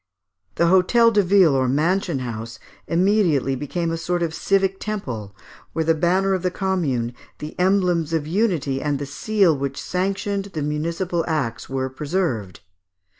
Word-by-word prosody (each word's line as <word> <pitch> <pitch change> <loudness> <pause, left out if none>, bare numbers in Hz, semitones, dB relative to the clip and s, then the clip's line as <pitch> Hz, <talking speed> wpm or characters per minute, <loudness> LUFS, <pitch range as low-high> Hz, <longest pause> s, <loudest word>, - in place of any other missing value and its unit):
The - - +2
hôtel 190 +7 +4
de 205 - +5
ville, 185 -4 +4
or 130 -1 +2
mansion 165 +4 +1
house, 115 0 -6 0.3
immediately 170 -7 +2
became 165 +5 -2
a 165 - -2
sort 175 +1 -1
of 160 -1 -2
civic 195 +2 +1
temple, 120 - -5 0.4
where 160 - -1
the 165 - +4
banner 185 +4 +2
of 185 - 0
the 180 - 0
Commune, 165 - -1 0.2
the 150 +1 -7
emblems 180 -4 +2
of 160 -3 0
unity, 160 -7 0
and 145 -2 0
the 140 - -4
seal 190 +4 +2
which 140 0 -4
sanctioned 195 +2 -2
the 160 -7 -5
municipal 165 +4 -1
acts 130 -9 -2
were 130 0 -1
preserved. 130 - -3
165 Hz, 155 wpm, -22 LUFS, 140-190 Hz, 0.4 s, de